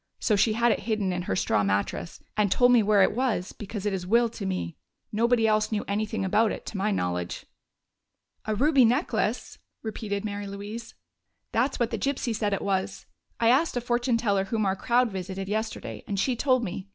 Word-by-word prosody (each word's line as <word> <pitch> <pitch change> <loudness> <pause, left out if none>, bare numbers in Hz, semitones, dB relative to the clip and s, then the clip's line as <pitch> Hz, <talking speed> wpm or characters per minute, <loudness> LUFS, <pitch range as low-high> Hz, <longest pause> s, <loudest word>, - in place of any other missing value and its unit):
So 215 - +2
she 215 +2 +3
had 235 +1 +3
it - - 0
hidden 205 -4 0
in 180 - -2
her 135 - -2
straw 100 +2 +1
mattress, 100 +11 -2
and 210 -2 +2
told 245 +3 +5
me 245 -2 +6
where 205 -1 +4
it 205 - +2
was, 235 -8 0
because 210 -1 -6
it 205 - 0
is 180 -2 -3
willed 235 +2 +3
to 200 - -5
me. 85 - -3 0.4
Nobody 230 +1 +2
else 215 0 +2
knew 210 -1 -1
anything 205 -1 -1
about 210 +3 +3
it, - - -6
to 210 - -5
my 200 +2 +1
knowledge." 90 - -2 1.0
"A 215 - -1
ruby 280 +3 +4
necklace!" 250 +8 0 0.2
repeated 215 -2 -4
Mary 205 -1 -4
Louise. 205 +4 -7 0.6
"That's 255 +4 0
what 235 -2 +1
the - - -2
gypsy 260 -4 -1
said 210 -1 0
it 200 - -1
was. 195 0 -2 0.3
I 230 - +4
asked 270 +2 +3
a - - 0
fortune 240 0 +1
teller 200 -4 +1
whom 215 +1 -1
our 190 0 +1
crowd 240 +2 +2
visited 190 0 -5
yesterday, 220 +2 -4
and 200 -2 -2
she 250 +5 +1
told 255 0 +2
me. 190 -1 -5
215 Hz, 200 wpm, -27 LUFS, 195-235 Hz, 1.0 s, me